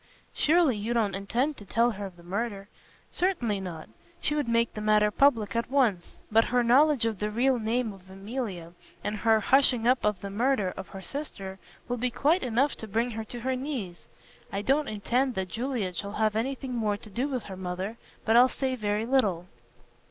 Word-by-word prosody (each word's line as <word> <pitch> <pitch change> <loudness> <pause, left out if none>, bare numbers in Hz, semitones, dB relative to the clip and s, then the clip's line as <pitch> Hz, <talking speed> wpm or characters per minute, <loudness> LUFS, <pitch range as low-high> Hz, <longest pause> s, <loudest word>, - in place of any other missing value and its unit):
"Surely 315 -5 +3
you 220 +3 -2
don't 215 -4 +1
intend 240 +10 -1
to 210 - -11
tell 230 +5 +2
her 200 -2 -5
of 185 - -13
the 170 - -15
murder." 200 +2 -3 0.4
"Certainly 250 - 0
not. 170 -4 -7 0.3
She 295 - -1
would 295 -5 -1
make 230 0 +2
the 215 - -5
matter 210 0 +3
public 230 -5 +3
at 230 0 -1
once. 235 -10 +1
But 225 +1 +5
her 245 0 +2
knowledge 265 +1 +4
of 220 -4 -1
the 210 - -1
real 245 +4 +2
name 225 0 -1
of 190 -1 -16
Emilia, 195 -4 -5 0.3
and 210 +1 -2
her 220 +1 +3
hushing 245 0 +3
up 250 +1 +3
of 210 -2 +1
the 200 - -5
murder 215 -3 +1
of - - -7
her 195 -1 -9
sister, 195 -10 -6 0.3
will 245 - -2
be 250 +2 0
quite 305 +9 +2
enough 255 +4 +1
to 220 - -7
bring 230 +4 0
her 225 0 -4
to 240 +2 -8
her 260 +2 0
knees. 250 - -5 0.4
I 200 0 -3
don't 280 +5 +2
intend 245 +5 0
that 190 -1 -2
Juliet 225 -4 -2
shall 200 0 -4
have 215 0 +1
anything 260 +2 -2
more 215 -4 0
to 210 - -12
do 245 +7 -1
with 255 -5 -3
her 190 - -8
mother. 185 +4 -4 0.3
But 225 - +3
I'll 250 +2 +7
say 260 -1 -2
very 210 -1 -1
little." 210 -10 +1
225 Hz, 205 wpm, -28 LUFS, 200-255 Hz, 0.4 s, I'll